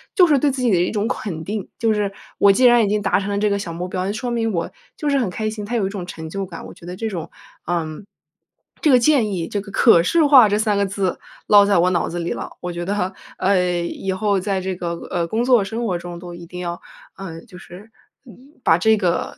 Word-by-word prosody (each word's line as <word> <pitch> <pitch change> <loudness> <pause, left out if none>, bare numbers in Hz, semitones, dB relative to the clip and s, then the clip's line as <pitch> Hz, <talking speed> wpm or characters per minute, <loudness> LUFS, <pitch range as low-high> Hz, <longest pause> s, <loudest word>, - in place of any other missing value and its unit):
就 370 -4 +7
是 295 -5 +3
对 290 +2 +2
自 260 -1 -3
己 240 - +3
的 185 - +4
一 - - +1
种 210 0 -1
肯 165 -9 -4
定。 205 +2 -4
就 225 -1 +1
是 205 -1 -1 0.3
我 200 - +7
既 250 +6 +3
然 240 -1 +6
已 205 - +1
经 210 +1 0
达 195 -1 +2
成 200 +1 -4
了 200 - -1
这 210 +1 +1
个 200 - 0
小 190 -4 -5
目 175 +2 -4
标， 185 0 -2
那 200 - -1
说 240 +3 -4
明 225 -1 0
我 170 -2 -2 0.3
就 300 - -2
是 280 - +2
很 230 -7 0
开 215 +4 -3
心， 215 -1 -6
它 235 +4 -3
有 215 -5 +1
一 - - -1
种 195 -3 -6
成 160 -3 -7
就 195 +2 -4
感， 175 -3 -9
我 - - -10
觉 170 - -15
得 180 - -6
这 225 +4 -3
种 170 -6 -5 0.4
嗯， 165 -1 -3 0.8
这 310 - +3
个 255 - +7
建 240 -5 +3
议 170 -3 -3
这 205 - -2
个 200 - -11
可 210 -5 +5
视 320 - +3
化 265 -6 +8
这 205 - +1
3 215 -1 +1
个 200 - +2
字 190 -2 -2 0.3
落 205 -1 +7
在 200 - +3
我 175 +2 +4
脑 170 - 0
子 175 - -5
里 170 - -3
了。 - - -4
我 180 - -4
觉 175 0 -4
得， 195 -1 -1 0.2
呃， 180 -2 +1
以 190 +2 -4
后 200 0 +1
在 195 0 -1
这 190 0 -3
个 175 -1 -4 0.2
呃， 175 -2 -1
工 220 +7 -1
作 245 -4 +4
生 225 +4 -4
活 180 -4 -1
中 175 0 -8
都 175 -1 -9
一 170 0 -10
定 180 0 -8
要， 175 0 -5 0.4
呃， 165 -4 -8
就 180 - -14
是， 200 +6 -13 0.3
嗯， 260 +4 -17
把 165 - +4
这 220 +3 +4
个 180 -4 -1
200 Hz, 285 characters per minute, -21 LUFS, 180-220 Hz, 0.8 s, 化